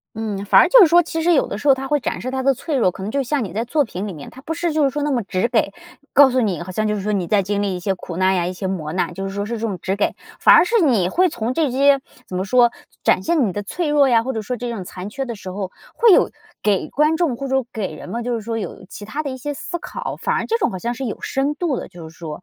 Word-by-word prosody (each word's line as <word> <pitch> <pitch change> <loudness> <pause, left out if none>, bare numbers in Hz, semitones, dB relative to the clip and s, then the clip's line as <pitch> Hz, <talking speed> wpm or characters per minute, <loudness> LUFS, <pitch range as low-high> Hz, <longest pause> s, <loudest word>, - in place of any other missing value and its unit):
嗯， 210 -3 -3
反 - - +7
而 - - +5
就 - - +8
是 370 - +9
说 345 +2 +5
其 325 -1 -3
实 350 +2 +3
有 280 - +3
的 200 - -5
时 285 - -2
候 270 - +8
它 270 0 -6
会 295 +1 +1
展 - - -3
示 255 - -4
他 265 0 -2
的 275 0 +3
脆 290 +4 -3
弱， 225 -8 +3
可 190 - -10
能 205 +3 -4
就 280 - +1
像 270 -1 -1
你 195 - -7
在 225 +3 -2
作 290 +4 +1
品 205 -3 -5
里 195 - -5
面， 150 -3 -10
它 260 - -13
不 325 +4 -4
是 335 0 -1
就 310 0 +1
是 275 - +3
说 295 +2 -3
那 295 - 0
么 250 -4 +1
直 190 +3 -1
给， 235 -1 +1 0.4
告 275 -1 +7
诉 255 - +1
你 195 -7 -1
好 185 - -8
像 215 +3 0
就 210 - 0
是 205 - -3
说 210 +2 -1
你 190 -4 0
在 200 +2 +2
经 205 +2 -1
历 195 -2 -1
一 - - -4
些 195 +1 0
苦 180 -2 -8
难 185 +1 +3
呀， 175 -2 0
一 180 - -2
些 185 +1 -5
磨 160 -5 -3
难， 185 - -1
就 195 0 -4
是 195 - -7
说 200 0 -2
是 230 +3 -4
这 - - -9
种 195 -4 -4
直 190 - -1
给。 205 - 0 0.3
反 - - +7
而 - - +7
是 450 +3 +2
你 230 - +3
会 365 - +3
从 235 -6 -3
这 300 0 +1
些 275 +2 +4 0.3
怎 185 - -6
么 185 - -1
说 240 +3 +4 0.3
展 - - +3
现 325 -7 +2
你 195 - -2
的 205 +3 -4
脆 325 - -3
弱 290 -2 +4
呀， 230 -3 +4
或 260 +3 -3
者 220 - -3
说 250 +4 -3
这 240 +1 -4
种 215 -5 -5
残 180 +1 -7
缺 270 +5 -4
的 235 - -5
时 195 -3 -8
候， 190 -1 -4 0.2
会 470 -1 +5
有 - - +5 0.3
给 205 -3 +1
观 300 +3 +2
众 315 -8 0
或 275 - -5
者 265 0 +1
给 215 -4 -3
人 - - -10
们 235 +5 -4
就 245 - -1
是 230 - -2
说 225 +1 -4
有 200 - -6
其 205 - -9
它 285 +9 -4
的 290 - -4
一 260 - -5
些 290 +3 -4
思 345 - -5
考， - - -6
反 - - -1
而 - - -1
这 455 - +1
种 - - +1
好 185 - -5
像 235 +6 -3
是 265 +2 -5
有 220 - -4
深 275 +2 -1
度 310 -4 -1
的 - - -5
就 170 -2 -10
是 165 - -17
说 160 0 -7
235 Hz, 355 characters per minute, -20 LUFS, 195-280 Hz, 0.4 s, 是